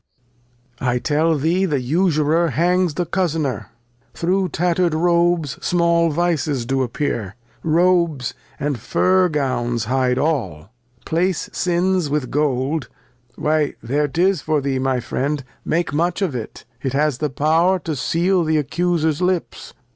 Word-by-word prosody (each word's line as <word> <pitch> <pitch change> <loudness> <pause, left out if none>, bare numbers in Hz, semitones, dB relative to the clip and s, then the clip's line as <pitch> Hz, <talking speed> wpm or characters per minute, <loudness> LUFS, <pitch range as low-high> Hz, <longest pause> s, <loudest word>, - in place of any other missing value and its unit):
I 125 -1 0
tell 155 +4 +1
thee 170 +7 +1
the 150 -7 0
Usurer 160 +3 +2
hangs 175 +3 +1
the 175 - -1
Couz'ner, 160 - -1 0.5
through 185 +2 0
tatter'd 175 0 +1
Robes 170 -3 +1
small 170 -1 +2
Vices 155 -5 0
do 135 +2 0
appear; 115 -6 -2 0.3
Robes, 170 -5 +2 0.3
and 145 -4 -2
Fur 185 - +2
Gowns 120 -6 -1
hide 125 +1 +1
aU: 130 - -1 0.4
Place 175 +2 -1
Sins 180 -2 +1
with 145 -3 -2
Gold; 145 +1 0 0.5
why 155 -1 0
there 145 +5 0
'tis 180 +5 +1
for 155 -1 0
thee, 135 -1 -1
my 130 -1 0
Friend, 140 +4 -2 0.2
make 170 -2 -1
much 175 +5 0
of 175 -7 -1
it; 115 -3 -7 0.2
it 130 0 -2
has 145 -2 +1
the 150 - -1
Power 160 +7 +2
to 160 -3 -3
seal 175 +7 +1
the 155 -1 +1
Accuser's 160 +1 0
Lips. 180 -1 -2
155 Hz, 135 wpm, -20 LUFS, 135-175 Hz, 0.5 s, Usurer